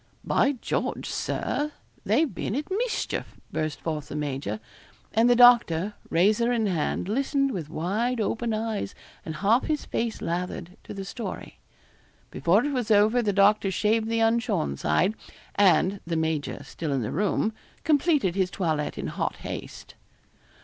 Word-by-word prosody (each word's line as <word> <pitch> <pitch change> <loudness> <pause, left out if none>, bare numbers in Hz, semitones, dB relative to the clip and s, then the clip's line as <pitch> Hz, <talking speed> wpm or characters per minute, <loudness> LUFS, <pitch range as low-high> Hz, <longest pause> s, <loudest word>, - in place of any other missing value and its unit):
'By 280 - +2
George, 255 - -3
Sir, 300 +1 -2 0.3
they've 315 -3 +2
been 210 - -3
at 295 +6 -4
mischief,' 460 +4 -2
burst 155 -1 -2
forth 155 -3 -3
the - - -7
major; 135 -7 -3 0.5
and 225 +2 +4
the 245 - +6
doctor, 230 -6 +6 0.2
razor 210 +7 +3
in 230 -3 +1
hand, 175 -2 -1
listened 275 +4 +1
with 165 - -5
wide 210 +10 -1
open 230 +2 -1
eyes 215 - -2 0.3
and 160 - -5
half 215 +8 +2
his 305 -1 -1
face 230 -1 -2
lathered, 175 +1 -4
to - - -8
the 195 -1 -5
story. 230 +4 -7 0.7
Before 195 +9 +2
it 290 - -1
was 245 -4 -1
over 215 +3 +5
the 210 -3 +1
doctor 200 0 +4
shaved 220 +3 +1
the 230 0 +1
unshorn 225 - +1
side, 75 - +1 0.4
and 195 0 +4
(the 165 -1 -1
major 160 -2 -2
still 160 -3 -5
in 130 -3 0
the 105 - -3
room) 210 +2 0 0.3
completed 295 - +2
his 190 -1 +1
toilet 160 -6 -2
in - - -4
hot - - -2
haste. - - -7
210 Hz, 155 wpm, -26 LUFS, 170-235 Hz, 0.7 s, the